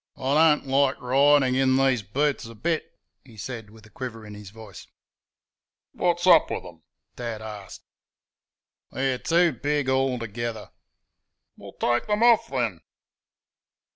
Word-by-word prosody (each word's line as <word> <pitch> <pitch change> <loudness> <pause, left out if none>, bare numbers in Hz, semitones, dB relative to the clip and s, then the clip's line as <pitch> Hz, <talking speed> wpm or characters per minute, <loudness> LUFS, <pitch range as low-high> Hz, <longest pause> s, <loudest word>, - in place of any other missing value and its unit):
"I 135 +2 -1 0.2
don't - - -12
like 135 0 +1
ridin' 135 +1 +3
in 130 0 +2
these 135 -3 +2
boots 140 +9 -1
a 115 - -11
bit," 160 +9 -3 0.3
he 115 -5 -17
said, 110 +1 -7
with 110 0 -17
a 110 - -19
quiver 115 -4 -7
in 105 - -10
his 105 -1 -11
voice. 110 -2 -13 1.1
"Wot's 175 0 0
up 175 -3 +6
with - - -4
'em?" 85 -2 -13 0.3
Dad 115 -3 -5
asked. 105 -3 -9 1.1
"They're 130 -1 -1
too 170 0 +2
big 145 +2 -2
altogether." 120 -4 -2 0.8
"Well, - - -12
take 120 - 0
'em 210 +2 +1
off 235 -2 +5
then!" 115 -10 -2
130 Hz, 140 wpm, -25 LUFS, 110-140 Hz, 1.1 s, up